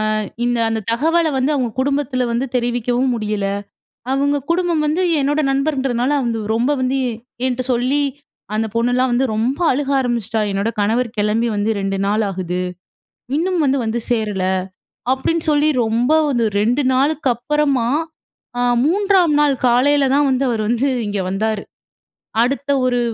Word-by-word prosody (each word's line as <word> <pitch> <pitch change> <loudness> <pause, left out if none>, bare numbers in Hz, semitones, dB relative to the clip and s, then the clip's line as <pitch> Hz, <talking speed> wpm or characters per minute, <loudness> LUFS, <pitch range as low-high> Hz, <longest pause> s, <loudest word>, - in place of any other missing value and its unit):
அ - - 0 0.3
இந்த 245 0 +1
அந்த 225 0 -1
தகவலை 320 +6 +2
வந்து 265 +3 +1
அவங்க 255 -4 0
குடும்பத்தில 270 -2 0
வந்து 235 +3 0
தெரிவிக்கவும் 245 +1 0
முடியல. 210 -2 -2 0.7
அவங்க 285 +1 +1
குடும்பம் 340 -2 +1
வந்து 315 +5 +1 0.2
என்னோட 290 +2 +1
நண்பர்ன்றதுனால 270 -2 0
வந்து 230 -1 -1
ரொம்ப 240 +5 +1
வந்து, 260 +1 0
எ 235 - -2 0.3
என்ட்ட 255 0 -1
சொல்லி 255 +4 +1 0.5
அந்த 220 +1 0
பொண்ணுலாம் 245 +2 +1
வந்து 255 +2 +2
ரொம்ப 250 +9 -1
அழுக 275 +1 -1
ஆரம்பிச்சுட்டா. 235 -3 -1
"என்னோட 200 +3 -1
கணவர் 230 +4 +1
கெளம்பி 215 +3 +1
வந்து 205 +2 0
2 195 0 -1
நாள் 210 +2 +1
ஆகுது. 180 -1 -3 0.8
இன்னும் 360 +3 0
வந்து, 275 -1 +2
வந்து 225 +2 -1
சேரல" 210 -5 0 0.7
அப்படீன்னு 320 +5 0
சொல்லி 295 +1 +3
ரொம்ப 230 +5 +1 0.2
வந்து 240 -4 +1
2 240 +7 +2
நாளுக்கு 280 +1 +1
அப்பறமா, 275 -1 0 0.7
அ - - +1 0.2
3ஆம் 370 -3 +3
நாள் 290 -2 +3
காலைல 275 +3 +3
தான் 290 0 +3
வந்து, 260 +1 +1
அவர் 225 -2 -1
வந்து 240 +4 +1 0.2
இங்க 205 -1 -2
வந்தாரு. 215 +1 -1 0.8
அடுத்த 275 +3 -2 0.2
ஒரு 245 -1 +1
250 Hz, 150 wpm, -19 LUFS, 230-285 Hz, 0.8 s, சொல்லி